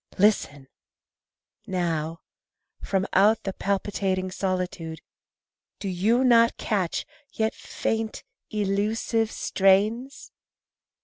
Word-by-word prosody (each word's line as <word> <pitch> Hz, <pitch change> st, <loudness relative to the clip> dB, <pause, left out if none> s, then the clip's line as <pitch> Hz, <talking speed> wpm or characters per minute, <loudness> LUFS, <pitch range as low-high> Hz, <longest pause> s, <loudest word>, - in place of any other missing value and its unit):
Listen! 185 Hz, -9 st, +2 dB, 1.0 s
Now, 165 Hz, -3 st, -2 dB, 0.6 s
From 195 Hz, -1 st, 0 dB
out 210 Hz, +3 st, +4 dB
the 195 Hz, -, -3 dB
palpitating 195 Hz, -1 st, -1 dB
solitude 180 Hz, -4 st, -3 dB, 0.8 s
Do 200 Hz, -, -5 dB
you 210 Hz, +7 st, +2 dB
not 230 Hz, -2 st, +5 dB
catch, 195 Hz, -6 st, -1 dB, 0.3 s
yet 220 Hz, 0 st, 0 dB
faint, 225 Hz, -1 st, -3 dB, 0.3 s
elusive 215 Hz, +2 st, 0 dB
strains? 210 Hz, +7 st, +1 dB
195 Hz, 80 wpm, -26 LUFS, 185-220 Hz, 1.0 s, not